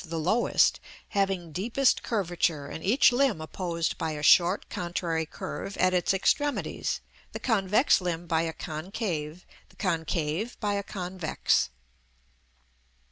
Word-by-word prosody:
_, - - -17
the 165 - -3
lowest, 185 +10 +3 0.3
having 195 -4 -1
deepest 235 - +1
curvature, 175 -8 -1
and 160 - -7
each 245 +7 +5
limb 245 -7 +2
opposed 170 +1 -3
by 160 -1 -1
a 150 -1 -6
short 175 +5 +5
contrary 170 -2 -2
curve 195 +3 -6
at 185 0 +3
its 180 -2 +2
extremities, 290 +9 0 0.3
the - - -4
convex 215 +1 +3
limb 175 -1 -3
by 165 -1 +1
a 165 -1 -1
concave, 160 0 -4 0.2
the - - -22
concave 165 +3 -2
by 205 -2 0
a 200 - 0
convex. 185 -4 -1
180 Hz, 135 wpm, -28 LUFS, 165-200 Hz, 0.3 s, each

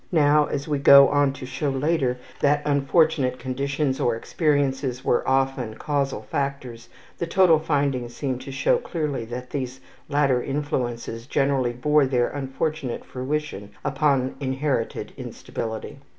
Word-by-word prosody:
Now, 150 -2 +4
as 140 +1 -3
we 145 -2 0
go 140 0 +8
on 145 -1 +3
to 130 - -8
show 130 +3 -2
later 135 -2 0 0.2
that 145 +1 +2
unfortunate 140 -2 +2
conditions 135 +2 -2
or 120 - +1
experiences 135 -1 0
were 120 - +3
often 130 -4 0
causal 140 -4 -2
factors, 125 -1 -4 0.3
the 170 - -2
total 170 -2 +5
findings 140 -6 -1
seem 130 -3 -2
to 135 - -8
show 480 - +2
clearly 150 - -3
that 125 +2 -7
these 130 -2 -4 0.3
latter 140 -4 +2
influences 120 -5 -3
generally 135 -3 +1
bore 150 +3 +3
their 125 -2 +1
unfortunate 140 -1 -3
fruition 130 -5 -4 0.2
upon 135 -2 +1
inherited 135 -2 -2
instability. 115 +5 -6
135 Hz, 135 wpm, -24 LUFS, 125-145 Hz, 0.3 s, go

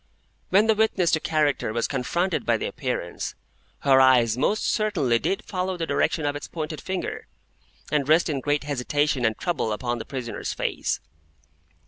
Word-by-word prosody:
When 200 +4 +5
the 220 - +4
witness 215 -5 +2
to 160 - +3
character 150 -7 0
was 115 +1 0
confronted 165 +8 -1
by - - +2
the - - -3
Appearance, - - -4 0.5
her 135 -1 +5
eyes 125 -4 +5
most 175 +12 +1
certainly 140 - +1
did 195 - -2
follow 185 -1 -2
the 165 - -2
direction 155 -1 0
of 145 0 0
its 145 - -6
pointed 155 -2 -5
finger, 190 -1 -4 0.6
and 145 -2 +1
rest 160 +2 +5
in 145 -4 -1
great 145 +2 0
hesitation 145 0 0
and 110 -1 +1
trouble 160 -10 -1
upon 120 +2 -2
the - - -6
prisoner's 130 -4 -4
face. - - -2
145 Hz, 165 wpm, -25 LUFS, 130-175 Hz, 0.6 s, When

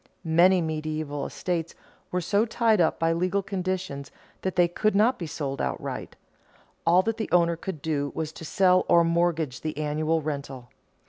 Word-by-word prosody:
Many 175 +3 +5
medieval 155 -2 -3
estates 170 -3 -3 0.3
were 180 - -1
so 200 +5 +2
tied 225 -3 +2
up 160 - +2
by 165 0 +1
legal 185 +4 0
conditions 185 -7 -3 0.3
that 190 - -2
they 175 -1 +5
could 215 +4 0
not 230 +5 +3
be 170 - -4
sold 140 -3 -4
outright; 65 - -4 0.7
all 180 +2 +5
that 225 +1 -1
the 220 - -3
owner 170 -1 +4
could 165 -3 -7
do 145 -3 -1
was 155 -1 -3
to 160 - -11
sell 185 +3 +3
or 170 - +6
mortgage 165 -5 0
the 155 -2 -4
annual 155 +2 0
rental. 140 -5 -5
170 Hz, 170 wpm, -26 LUFS, 155-185 Hz, 0.7 s, or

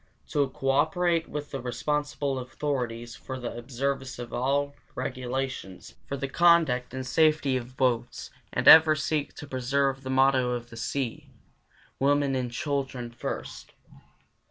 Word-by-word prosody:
4. 145 -3 +2
To - - -15
cooperate 165 +6 +1
with 145 -1 -5
the 135 - -4
responsible 145 +2 -2
authorities 125 -3 -3
for 130 -1 -7
the 120 -2 -5
observance 130 +2 -3
of 120 -1 -7
all 140 +3 0 0.2
regulations 130 -6 -4
for 140 - -3
the 135 +1 -3
conduct 160 -6 +3
and 130 +1 -5
safety 150 0 +3
of 125 +1 -5
boats 120 -2 -1 0.2
and - - -1
ever 160 -1 +10
seek 150 -1 -2
to - - -8
preserve 135 0 0
the 130 - -7
motto 130 -1 +3
of 120 -1 -5
the - - -9
sea, 120 +1 -3 0.7
"Women 140 0 +2
and 125 -2 -2
Children 135 -2 -3
First." 120 - -6
135 Hz, 140 wpm, -27 LUFS, 125-145 Hz, 0.7 s, ever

